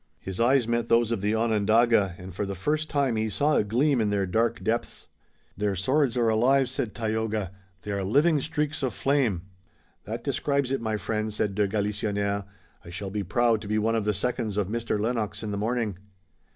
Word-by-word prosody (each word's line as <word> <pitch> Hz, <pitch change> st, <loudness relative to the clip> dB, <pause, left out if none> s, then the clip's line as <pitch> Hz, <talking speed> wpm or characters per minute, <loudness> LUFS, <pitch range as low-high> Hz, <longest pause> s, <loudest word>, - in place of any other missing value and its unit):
His 95 Hz, -1 st, -6 dB
eyes 125 Hz, 0 st, +3 dB
met 120 Hz, 0 st, 0 dB
those 115 Hz, 0 st, +3 dB
of 115 Hz, -4 st, -1 dB
the 105 Hz, +2 st, +1 dB
Onondaga 110 Hz, -2 st, +3 dB
and 95 Hz, 0 st, -9 dB
for 100 Hz, -, -3 dB
the 100 Hz, -1 st, -4 dB
first 150 Hz, -, -1 dB
time 135 Hz, -5 st, +1 dB
he 110 Hz, 0 st, 0 dB
saw 140 Hz, +10 st, +1 dB
a -, -, +3 dB
gleam 125 Hz, +5 st, +2 dB
in 105 Hz, -, +1 dB
their 100 Hz, -1 st, +1 dB
dark 115 Hz, +5 st, 0 dB
depths. 115 Hz, +1 st, -2 dB, 0.5 s
"Their 100 Hz, 0 st, -1 dB
swords 130 Hz, -, +1 dB
are 120 Hz, -1 st, +2 dB
alive," 125 Hz, +4 st, +3 dB
said 120 Hz, -5 st, -3 dB
Tayoga. 110 Hz, -4 st, -2 dB, 0.3 s
"They 105 Hz, -, -4 dB
are 100 Hz, -1 st, -1 dB
living 145 Hz, -, +3 dB
streaks 150 Hz, 0 st, -2 dB
of 130 Hz, -3 st, -1 dB
flame." 130 Hz, -11 st, +1 dB, 0.6 s
"That -, -, -5 dB
describes 140 Hz, -2 st, 0 dB
it, 135 Hz, -, 0 dB
my 110 Hz, -1 st, -1 dB
friend," 110 Hz, +2 st, -2 dB
said 105 Hz, -1 st, -1 dB
de 105 Hz, 0 st, +1 dB
Galisonnière. 100 Hz, -1 st, -1 dB, 0.4 s
"I 85 Hz, -, -11 dB
shall 95 Hz, +3 st, -5 dB
be 105 Hz, +1 st, -2 dB
proud 115 Hz, +3 st, +2 dB
to -, -, -8 dB
be 105 Hz, +1 st, 0 dB
one 110 Hz, +2 st, +1 dB
of 110 Hz, -2 st, 0 dB
the 105 Hz, -, +2 dB
seconds 110 Hz, -2 st, -2 dB
of 100 Hz, -2 st, 0 dB
Mr. 115 Hz, -1 st, -1 dB
Lennox 115 Hz, -1 st, -2 dB
in 105 Hz, -, -3 dB
the -, -, -2 dB
morning." 110 Hz, -3 st, -1 dB
110 Hz, 205 wpm, -26 LUFS, 105-120 Hz, 0.6 s, eyes